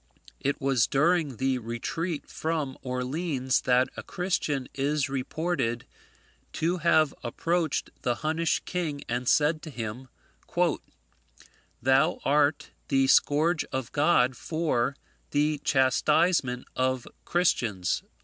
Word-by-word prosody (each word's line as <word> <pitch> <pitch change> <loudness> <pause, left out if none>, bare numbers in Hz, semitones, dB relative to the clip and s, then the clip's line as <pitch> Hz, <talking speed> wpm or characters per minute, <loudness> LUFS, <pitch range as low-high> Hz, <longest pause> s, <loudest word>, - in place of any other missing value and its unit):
It 140 +1 -1
was 135 -5 +2
during 150 -2 +2
the 130 +1 0
retreat 145 +8 -4
from 155 -4 -2
Orleans 130 +1 -1
that 125 +1 +4
a - - -5
Christian 155 -7 -2
is 140 +1 0
reported 135 -3 -2 0.7
to 170 +3 0
have 160 -3 +3
approached 165 +5 -1
the 120 - 0
Hunnish 160 +1 +1
king, 160 -6 -3
and 120 +1 -1
said 155 +1 +3
to 155 - -8
him, 120 -1 -6 1.8
"Thou 135 +7 +3
art 145 +1 +2 0.2
the 135 0 +3
Scourge 155 +5 +3
of 130 -3 -4
God 145 -4 +3
for 140 -4 -1 0.3
the 150 +1 +1
chastisement 130 0 +2
of 130 -1 0 0.2
Christians." 115 - +1
140 Hz, 110 wpm, -27 LUFS, 130-160 Hz, 1.8 s, that